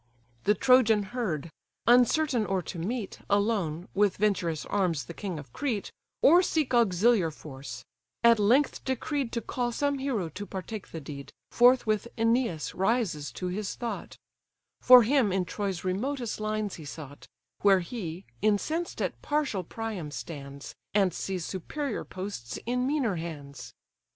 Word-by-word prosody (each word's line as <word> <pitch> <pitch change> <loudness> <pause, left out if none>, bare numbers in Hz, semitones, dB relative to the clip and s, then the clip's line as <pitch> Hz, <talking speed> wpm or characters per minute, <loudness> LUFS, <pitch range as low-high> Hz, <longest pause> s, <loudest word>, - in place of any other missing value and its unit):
The 210 - +4
Trojan 245 -5 +5
heard; 170 - -2 0.3
uncertain 250 +1 +4
or 190 -2 0
to 170 - -6
meet, 210 +4 -3
Alone, 200 -5 +1
with 205 -1 +2
venturous 180 -7 0
arms 180 -7 0
the 170 - -8
king 185 -2 -5
of 140 -5 -10
Crete, 240 -9 -2 0.3
Or 345 +5 +8
seek 315 -6 0
auxiliar 215 -4 +4
force; 135 -5 -9 0.4
at 235 -1 +6
length 245 +8 +3
decreed 265 0 -2
To 235 - -1
call 245 0 -2
some 285 +3 0
hero 250 -10 -1
to 205 +5 -7
partake 195 +2 -6
the 165 - -7
deed, 140 -1 -8 0.2
Forthwith 240 -3 +4
Æneas 230 -7 +1
rises 190 -7 0
to 180 - -3
his 195 +2 -3
thought: 235 -1 -5 0.6
For 250 -1 +9
him 245 -3 +3
in 185 -1 +1
Troy's 195 -1 -3
remotest 235 +6 -2
lines 215 -1 -2
he 160 - -10
sought, 145 -1 -9 0.3
Where 195 -2 +5
he, 180 -3 -6 0.2
incensed 260 - 0
at - - -3
partial 290 -10 0
Priam, 210 -4 -5
stands, 140 -2 -8 0.2
And 195 -3 +3
sees 185 -3 -3
superior 265 - -4
posts 185 -11 -6
in 250 +2 0
meaner 265 - 0
hands. 140 -7 -7
205 Hz, 145 wpm, -28 LUFS, 170-240 Hz, 0.6 s, For